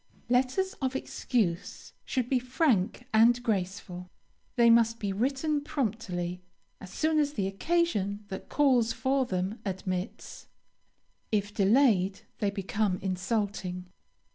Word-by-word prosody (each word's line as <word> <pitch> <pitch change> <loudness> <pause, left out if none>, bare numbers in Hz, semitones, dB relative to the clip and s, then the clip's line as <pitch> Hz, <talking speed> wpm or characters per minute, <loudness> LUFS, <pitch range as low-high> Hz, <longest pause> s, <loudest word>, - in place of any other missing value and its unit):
LETTERS 260 +10 +1
OF 260 0 -1
EXCUSE 215 -9 -2
should 255 -3 -1
be 255 0 +2
frank 250 - +1
and 235 +2 +5
graceful. 185 -4 -3 0.5
They 235 -2 +6
must 230 0 +4
be 200 -3 -2
written 275 +7 0
promptly, 200 - -3 0.4
as 190 - -10
soon 315 +5 +1
as 290 -1 +1
the 200 -8 -1
occasion 205 - 0
that 190 - -7
calls 255 -6 +3
for 260 +3 0
them 190 +4 -2
admits. 185 -1 -5 0.8
If 205 -1 0
delayed, 200 -3 +3 0.2
they 205 - +1
become 200 0 -1
insulting. 185 -1 -2
220 Hz, 115 wpm, -29 LUFS, 190-255 Hz, 0.8 s, They